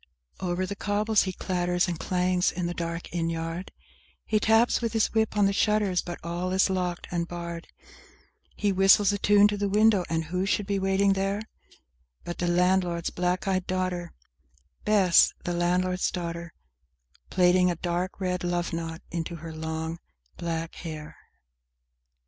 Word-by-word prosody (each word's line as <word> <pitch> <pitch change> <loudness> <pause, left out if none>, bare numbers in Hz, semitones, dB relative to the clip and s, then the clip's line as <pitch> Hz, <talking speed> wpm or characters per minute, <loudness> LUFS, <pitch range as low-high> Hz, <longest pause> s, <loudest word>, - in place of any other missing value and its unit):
XI - - -4
Over 175 +1 -1
the 200 - -5
cobbles 210 +2 +1
he 190 - -2
clatters 180 0 0
and 170 -3 -3
clangs 180 0 +1
in 180 0 -3
the 175 - -2
dark 170 0 -5
inn 165 -1 0
yard; 165 +2 -4 0.5
He 215 - +1
taps 225 +3 +3
with 230 -1 -2
his 225 -1 +1
whip 220 -1 +1
on 205 - +5
the 200 - +2
shutters, 205 -3 +2
but 175 -1 -6
all 175 +2 -3
is 190 0 +3
locked 180 -2 -2
and 170 -1 -1
barred; 170 -1 -6 0.9
He 205 -1 +1
whistles 195 +1 +5
a 200 - -2
tune 205 +1 +6
to 205 - -2
the 200 0 -1
window, 210 -1 +4
and 165 0 0
who 180 +4 -2
should 205 +1 +1
be 200 0 -1
waiting 195 +1 +2
there 195 +2 -1 0.8
But 175 - -6
the 175 - 0
landlord's 175 -1 +1
black 180 +2 -1
eyed 185 -1 0
daughter, 185 -2 -2 0.7
Bess, 195 -5 +5
the 175 - -2
landlord's 180 +1 +1
daughter, 170 -1 -5 0.7
Plaiting 180 0 +4
a 175 - 0
dark 175 +3 -3
red 180 -2 -2
love 175 -1 -1
knot 165 0 -5
into 170 0 -3
her 165 0 -8
long 160 +1 -4 0.4
black 165 -1 -4
hair. 155 -3 -7
180 Hz, 165 wpm, -27 LUFS, 170-195 Hz, 0.9 s, tune